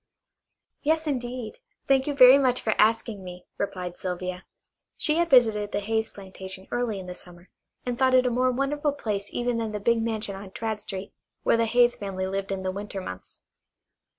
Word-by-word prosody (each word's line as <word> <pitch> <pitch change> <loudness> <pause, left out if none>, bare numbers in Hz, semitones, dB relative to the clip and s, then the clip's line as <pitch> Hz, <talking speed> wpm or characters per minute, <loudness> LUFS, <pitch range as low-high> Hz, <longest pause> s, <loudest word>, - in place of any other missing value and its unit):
"Yes, 315 +2 +1
indeed; 250 - -4 0.3
thank 270 0 +3
you 290 - -1
very 255 +1 +9
much 255 -2 +2
for 220 - 0
asking 220 -2 +2
me," 180 0 -9
replied 180 -3 -3
Sylvia. 180 0 -4 0.5
She 305 +1 +2
had 340 0 +2
visited 220 -5 +4
the 205 - 0
Hayes 220 +2 -1
plantation 190 -1 -9
early 240 -4 -1
in 185 - -8
the 180 - -6
summer, 175 0 -15 0.4
and 245 -1 -3
thought 260 -1 +4
it 255 0 +5
a 250 - +2
more 255 +2 +2
wonderful 280 +3 0
place 210 -7 -3
even 240 -1 -1
than 220 -2 -3
the 210 - -2
big 230 +2 +2
mansion 220 -3 -2
on 195 0 -9
Tradd 220 +2 -3
Street 195 -1 -7 0.3
where - - +4
the 230 - +2
Hayes 240 +1 +4
family 190 -2 -3
lived 195 +1 -3
in 190 -1 -3
the 185 - -1
winter 200 0 -5
months. 95 - -9
220 Hz, 190 wpm, -26 LUFS, 195-250 Hz, 0.5 s, very